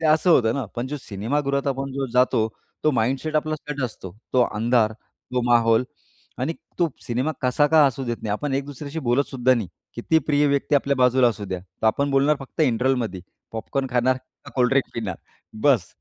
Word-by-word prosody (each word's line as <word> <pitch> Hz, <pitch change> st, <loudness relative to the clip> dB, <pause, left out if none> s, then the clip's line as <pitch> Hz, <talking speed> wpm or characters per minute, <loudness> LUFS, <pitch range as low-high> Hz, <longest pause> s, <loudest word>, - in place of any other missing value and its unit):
ते 160 Hz, -, +1 dB
असं 155 Hz, +3 st, +4 dB
होतं 115 Hz, -7 st, +4 dB
ना, 140 Hz, -, -2 dB
पण 120 Hz, +2 st, -2 dB
जो 150 Hz, -, -4 dB
सिनेमागृहात 140 Hz, +7 st, -2 dB
आपण 135 Hz, 0 st, -3 dB
जो 135 Hz, 0 st, -2 dB
जातो, 125 Hz, -3 st, +3 dB, 0.4 s
तो 155 Hz, -, +5 dB
माइंडसेट 135 Hz, +7 st, 0 dB
आपला 155 Hz, 0 st, 0 dB
सेट 145 Hz, -1 st, -6 dB
असतो. 100 Hz, -5 st, -7 dB, 0.2 s
तो 125 Hz, -, +5 dB
अंधार, 110 Hz, 0 st, +2 dB
तो 125 Hz, +3 st, -6 dB
माहोल 115 Hz, 0 st, +4 dB, 0.6 s
आणि 165 Hz, -, 0 dB, 0.3 s
तो 170 Hz, -2 st, +3 dB
सिनेमा 130 Hz, +6 st, -1 dB
कसा 125 Hz, +4 st, +3 dB
का 155 Hz, -1 st, +5 dB
असू 135 Hz, 0 st, -2 dB
देत 120 Hz, -1 st, -2 dB
नाही, 105 Hz, -, -3 dB
आपण 140 Hz, +7 st, -2 dB
एक 140 Hz, -, -1 dB
दुसऱ्याशी 145 Hz, +2 st, -7 dB
बोलत 130 Hz, +4 st, +3 dB
सुद्धा 130 Hz, -1 st, +3 dB
नाही. 110 Hz, -7 st, -3 dB, 0.3 s
किती 160 Hz, +7 st, +2 dB
प्रिय 145 Hz, -1 st, +3 dB
व्यक्ती 140 Hz, +1 st, +1 dB
आपल्या 140 Hz, 0 st, +2 dB
बाजूला 125 Hz, 0 st, +4 dB
असू 105 Hz, -3 st, -4 dB
द्या. 95 Hz, -2 st, -4 dB
तर 95 Hz, +4 st, -5 dB
आपण 140 Hz, +6 st, +2 dB
बोलणार 140 Hz, +2 st, +3 dB
फक्त 135 Hz, +4 st, -8 dB
इंटरवलमध्ये. 125 Hz, -6 st, +1 dB, 0.3 s
पॉपकॉर्न 135 Hz, +4 st, -2 dB
खाणार? 125 Hz, +1 st, +2 dB, 0.3 s
का -, -, -10 dB
कोल्डड्रिंक 130 Hz, +2 st, +2 dB
पिणार? 105 Hz, -7 st, -3 dB, 0.5 s
बस्स 130 Hz, -11 st, +4 dB
130 Hz, 190 wpm, -23 LUFS, 115-140 Hz, 0.6 s, तो